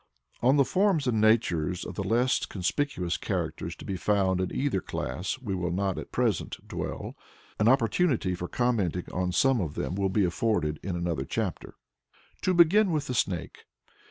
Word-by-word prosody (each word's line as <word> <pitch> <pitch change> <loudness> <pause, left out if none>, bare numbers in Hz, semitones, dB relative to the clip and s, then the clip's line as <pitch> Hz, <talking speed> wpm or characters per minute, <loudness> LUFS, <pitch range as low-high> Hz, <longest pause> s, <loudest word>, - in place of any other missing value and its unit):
On 130 +4 +4
the 140 - +5
forms 185 -5 +2
and 115 -4 +1
natures 90 -6 +2
of - - -6
the 100 - -3
less 120 +6 +2
conspicuous 95 - -1
characters - - -3
to - - -11
be 95 - -3
found 95 -1 +1
in 90 - -2
either 130 -9 0
class 70 - -3
we 115 -7 -4
will 90 -2 -1
not 95 +2 -1
at - - -9
present - - 0
dwell. - - -5 0.4
An 105 - +3
opportunity 125 - +2
for 90 0 -4
commenting 100 -9 0
on 90 0 0
some 130 +5 +3
of 80 -4 -4
them - - -2
will 95 0 0
be 95 +1 +2
afforded 85 -5 0
in 95 -2 -3
another 85 -1 -1
chapter. - - -3 0.7
To 185 - +1
begin 180 +4 +5
with 150 -3 0
the 130 - -3
Snake. 90 -8 -2
100 Hz, 175 wpm, -28 LUFS, 90-130 Hz, 0.7 s, the